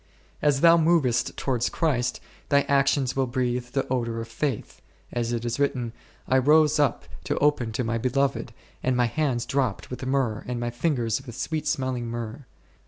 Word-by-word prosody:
As 145 -2 +2
thou 170 0 +7
movest 155 -8 +2
towards 125 -3 0
Christ, 130 -7 0 0.3
thy 140 -1 +5
actions 140 -2 +2
will 135 -1 +1
breathe 125 -1 -1
the 135 +2 -1
odour 115 -2 -1
of 115 0 -6
faith, 125 +1 -3 0.3
as 120 -1 -1
it 120 0 -2
is 120 +3 -2
written, 130 -5 0 0.2
/ - - -32
rose 150 +4 +4
up 145 -10 +1 0.2
to - - -1
open 145 -6 +2
to 125 +2 -1
my 115 0 -1
Beloved, 130 +1 0 0.3
and 130 -1 +1
my 125 - +4
hands 125 -1 0
dropped 130 -9 -1
with 125 - -5
myrrh 130 -5 0
and 125 -1 -3
my 120 0 -2
fingers 120 -3 0
with 120 -4 -9
sweet 155 +4 -3
smelling 130 -3 -1
myrrh. 120 +3 -5
130 Hz, 175 wpm, -26 LUFS, 120-140 Hz, 0.3 s, thou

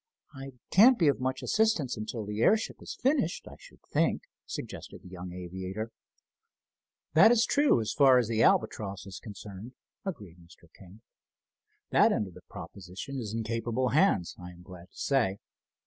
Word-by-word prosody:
"I 135 -1 -9 0.2
can't 240 +6 +7
be 165 - +3
of 140 - 0
much 130 +1 -2
assistance 215 - +1
until 110 0 -5
the 105 +1 -4
airship 220 - +2
is - - -8
finished, 265 - 0
I - - -10
should - - -17
think," - - +1 0.2
suggested - - -8
the - - -12
young 90 0 -8
aviator. 95 +5 -6 1.2
"That 160 +7 +8
is 235 -1 +4
true 285 - +3
so - - -3
far 135 -2 +7
as 120 -3 +2
the 115 0 0
Albatross 100 -4 +1
is 95 -1 -8
concerned," 105 +1 -10 0.3
agreed 100 - -7
Mr. 85 0 -19
King. 95 +3 -16 0.9
"That - - +5
end 105 - 0
of 95 - -11
the - - -13
proposition 100 +9 -8
is 110 -2 -5
in 115 - -2
capable 115 +3 -1
hands, 145 - +2
I 90 0 -8
am 90 0 -14
glad 90 0 -12
to - - -23
say. 120 -9 +1
110 Hz, 170 wpm, -29 LUFS, 95-140 Hz, 1.2 s, That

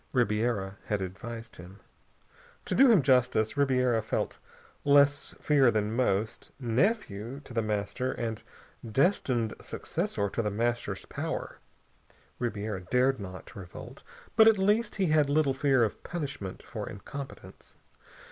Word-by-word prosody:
Ribiera 105 -4 0
had 105 - -1
advised 115 +5 -7
him. 90 +3 -12 0.9
To - - -1
do 270 0 +7
him 205 -11 +6
justice, 125 -4 +3
Ribiera 125 -4 +2
felt 110 - -2 0.4
less 145 0 +4
fear 140 -4 +4
than 110 -1 0
most. 110 -3 0
Nephew 125 - 0
to 135 - -12
The 115 - +1
Master, 105 +4 -2
and 115 -4 -4 0.4
destined 120 - +1
successor 100 - -2
to 110 - -2
The 105 - -1
Master's 120 +3 -2
power, - - -4 0.8
Ribiera 105 -4 -3
dared 125 +7 +2
not 95 -2 -9
revolt, 90 -3 -10 0.3
but 220 - +8
at 220 -2 +6
least 210 +4 +2
he 195 - +1
had 155 -2 +3
little 145 -2 +3
fear 135 -2 +3
of 110 - -2
punishment 140 - -5
for - - -6
incompetence. 135 +7 -9
120 Hz, 130 wpm, -29 LUFS, 105-140 Hz, 0.9 s, but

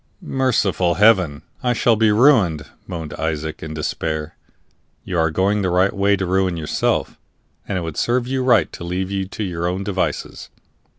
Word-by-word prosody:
"Merciful 100 - +1
Heaven! 90 -9 +3 0.2
I 125 -1 +1
shall 115 0 +3
be 110 0 +3
ruined!" 105 - +4 0.2
moaned 80 -4 -6
Isaac, 80 -1 -3
in 80 0 -6
despair. 80 0 -3 0.7
"You 90 -2 -2
are 80 0 +3
going 100 +5 +1
the 95 - 0
right 90 +2 +2
way 100 0 +2
to 95 -1 -2
ruin 95 -1 0
yourself, 80 -2 -1 0.5
and 100 - -2
it - - -2
would 80 -3 -6
serve 120 0 +1
you 130 +1 -1
right 120 -10 +3
to - - -8
leave 90 +2 -3
you 95 -1 -2
to 105 +2 -5
your 85 -3 -2
own 90 +2 -2
devices. 95 -1 -3
95 Hz, 175 wpm, -20 LUFS, 80-105 Hz, 0.7 s, ruined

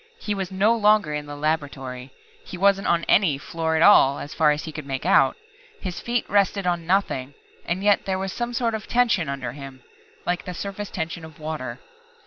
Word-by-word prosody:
He 210 - -2
was 195 -2 -3
no 205 +5 +3
longer 210 -7 +3
in 150 0 -4
the 145 - -7
laboratory. 140 -4 -3 0.3
He 180 - -8
wasn't 195 +1 +3
on 170 -1 +2
any, 170 -8 +3
floor 160 +2 -2
at 160 - +3
all, 140 -9 +6
as 145 - -7
far 155 -1 +3
as 150 0 0
he 160 - -6
could 155 -2 -8
make 135 -1 -4
out. 135 -1 +4 0.4
His 180 -2 -5
feet 240 0 -2
rested 200 -1 +1
on 175 -2 -1
nothing 145 -8 0 0.3
and 180 +3 -2
yet 205 -1 +3
there 190 -1 -1
was 190 0 -3
some 240 0 -3
sort 235 -1 0
of 220 -1 -5
tension 235 - +2
under 135 -3 -4
him 135 -1 -10 0.4
like 175 0 -1
the 180 - -6
surface 200 +2 -5
tension 165 0 -4
of 160 -1 -11
water. 155 0 -5
170 Hz, 205 wpm, -24 LUFS, 145-200 Hz, 0.4 s, all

